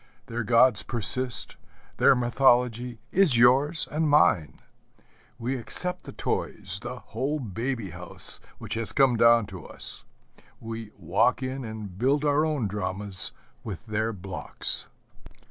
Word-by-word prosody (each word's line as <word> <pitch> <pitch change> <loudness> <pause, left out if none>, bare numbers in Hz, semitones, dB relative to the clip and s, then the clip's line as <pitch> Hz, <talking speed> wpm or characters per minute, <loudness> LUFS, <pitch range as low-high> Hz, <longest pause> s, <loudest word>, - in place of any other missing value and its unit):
Their 120 0 -4
gods 115 0 +4
persist, 120 +2 +1 0.4
their - - +5
mythology 125 -1 +1
is 180 -10 +5
yours 135 +7 +5
and 155 0 0
mine. 90 - +3 0.8
We 125 +2 -3
accept 180 +9 -2
the - - -8
toys, - - -4
the - - -6 0.2
whole 145 +4 -1
baby 115 -2 -4
house 90 +1 -9 0.2
which 105 - -7
has 115 -1 -3
come 135 -3 +4
down 115 -1 +5
to 90 - -9
us: - - -6 0.6
we 115 -1 -7
walk - - +1
in 130 +1 -4
and 105 -5 -8
build 140 +4 +1
our 145 +1 +2
own 150 -7 -1
dramas 95 -1 -2 0.3
with 105 -6 -7
their 110 +1 -1
blocks. 95 -3 +1
120 Hz, 130 wpm, -26 LUFS, 105-135 Hz, 0.8 s, their